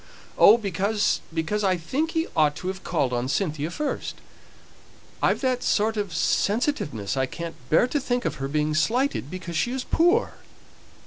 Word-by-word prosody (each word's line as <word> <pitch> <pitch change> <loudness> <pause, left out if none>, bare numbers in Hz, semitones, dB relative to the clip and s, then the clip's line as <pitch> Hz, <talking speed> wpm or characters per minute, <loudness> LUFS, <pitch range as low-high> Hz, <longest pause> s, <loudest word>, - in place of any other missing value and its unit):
"Oh, 215 - +7
because 205 0 0
because 165 +6 -1
I 185 -2 +2
think 285 - -2
he 325 - +2
ought 150 -2 +3
to 185 - -4
have 190 0 -6
called 125 -2 0
on 120 +1 -1
Cynthia 155 -2 -1
first; 285 - -3 1.1
I've - - +2
that 255 -2 0
sort 220 +1 +1
of 205 -5 -3
sensitiveness 200 - 0
I 130 -1 0
can't 170 +3 -6 0.2
bear 160 - +5
to 290 - 0
think 245 -2 -2
of - - -2
her 135 - -1
being 150 +2 0
slighted 230 - 0
because 175 -1 -6
she 240 - 0
is 260 0 -3
poor." 350 +8 +2
190 Hz, 170 wpm, -25 LUFS, 155-245 Hz, 1.1 s, Oh